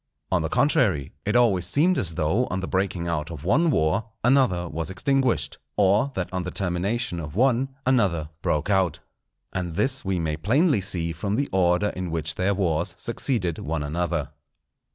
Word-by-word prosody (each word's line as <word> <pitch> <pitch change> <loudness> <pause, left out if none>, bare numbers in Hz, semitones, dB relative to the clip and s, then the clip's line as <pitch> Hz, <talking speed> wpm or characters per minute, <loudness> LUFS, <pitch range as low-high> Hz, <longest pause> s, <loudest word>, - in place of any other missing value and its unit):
On 95 -2 +2
the 80 - -2
contrary, 95 - +2
it 105 - +1
always 100 -8 +3
seemed 160 - +3
as 85 -9 0
though 90 +10 +1
on 90 - -2
the 95 - -4
breaking 95 -2 -1
out 80 -2 -2
of 80 -4 -8
one 155 - +3
war, 80 - +1 0.2
another 125 -9 +3
was 80 0 -4
extinguished; 130 +6 0 0.2
or 105 +7 +3
that 95 - -2
on 90 - -1
the 90 - -4
termination 95 +3 -1
of 75 -1 -7
one, 130 +3 +2 0.2
another 95 - +1
broke 75 +6 0
out. 95 -5 +2 0.6
And 90 -3 -3
this 135 +5 +1
we 95 -2 -1
may 80 -2 -2
plainly 130 - +2
see 90 -4 -1
from 100 +5 -2
the 140 +4 0
order 90 +2 +2
in 90 -2 -5
which 80 -1 -1
their 95 +4 0
wars 85 -4 0
succeeded 95 - -1
one 80 0 -3
another. 85 +3 -2
95 Hz, 175 wpm, -24 LUFS, 85-115 Hz, 0.6 s, always